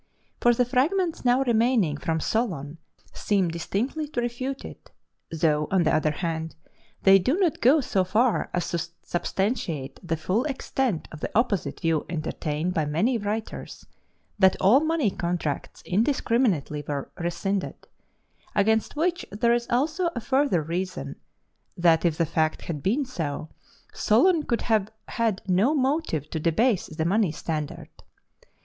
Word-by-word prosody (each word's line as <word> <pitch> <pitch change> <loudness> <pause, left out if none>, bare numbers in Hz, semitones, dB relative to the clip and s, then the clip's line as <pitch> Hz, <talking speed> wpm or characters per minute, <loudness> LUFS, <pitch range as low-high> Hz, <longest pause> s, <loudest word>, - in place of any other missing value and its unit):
For 240 - +5
the 250 - +2
fragments 315 +8 +1
now 250 +2 +3
remaining 230 - +2
from 160 +2 -2
Solon 165 - -2 0.3
seem 195 -4 +1
distinctly 220 - -2
to 245 -5 -2
refute 255 +3 -4
it, - - -11 0.4
though, 155 -2 +1
on 190 -2 +3
the 155 - +2
other 155 0 +2
hand, 160 +1 -3 0.5
they 195 0 +7
do 260 - +1
not 360 -7 +1
go 280 +6 +5
so 195 -6 +1
far 215 +6 +1
as 180 - -1
to 170 - -1 0.2
substantiate 175 - -2
the 165 -3 -2
full 190 +9 0
extent 265 - -2
of 155 - -9
the - - -3
opposite 225 -5 0
view 165 -3 0
entertained 160 0 -2
by 160 - +1
many 210 - +1
writers 210 +2 -5 0.5
that 190 -1 +4
all 205 +8 +6
money 315 -8 +1
contracts 170 -5 -3
indiscriminately 215 - +1
were 140 -2 -4
rescinded 180 +3 -2 0.8
against 220 +4 +2
which 350 +3 0
there 235 +4 +2
is 240 0 0
also 310 +8 +1
a - - -1
further 260 - +1
reason, 170 -4 -4 0.6
that 170 -2 +4
if 165 -2 +1
the 165 - +2
fact 160 0 0
had 150 -4 -4
been 245 - +1
so, 155 - -4 0.4
Solon 315 - +3
could 235 - -1
have 215 -3 +1 0.2
had 225 -5 -1
no 200 +11 +3
motive 265 - 0
to 160 - -2
debase 185 +7 +2
the 160 0 -3
money 195 0 +2
standard. 155 -2 -4
195 Hz, 145 wpm, -25 LUFS, 165-250 Hz, 0.8 s, they